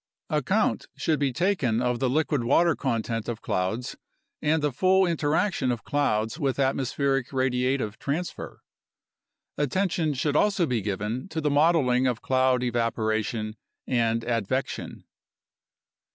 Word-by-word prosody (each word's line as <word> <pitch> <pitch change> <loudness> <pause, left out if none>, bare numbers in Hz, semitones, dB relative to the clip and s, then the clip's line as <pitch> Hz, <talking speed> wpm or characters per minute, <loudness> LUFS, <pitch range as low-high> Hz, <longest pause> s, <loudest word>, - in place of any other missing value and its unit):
Account - - +1
should 155 -2 0
be 140 -2 +1
taken 150 - +1
of 125 -1 0
the 130 - +1
liquid 145 -1 +1
water 165 +7 +3
content 115 -3 -2
of 115 -2 -5
clouds 95 +7 -2 0.5
and 150 0 +1
the 150 - +1
full 190 +7 +3
interaction 160 -3 +1
of 120 -4 -4
clouds 115 -3 0
with 135 -4 0
atmospheric 135 0 0
radiative 130 -3 0
transfer. 160 +6 -4 1.0
Attention 160 +1 0
should 145 +3 -1
also 200 0 +3
be 125 -7 -1
given 105 - -3
to 160 - -3
the 150 -2 0
modeling 145 -4 +3
of 120 -3 -1
cloud 130 -1 +2
evaporation 110 -2 -1 0.3
and 115 -2 +1
advection. 120 +2 -2
130 Hz, 125 wpm, -26 LUFS, 115-150 Hz, 1.0 s, water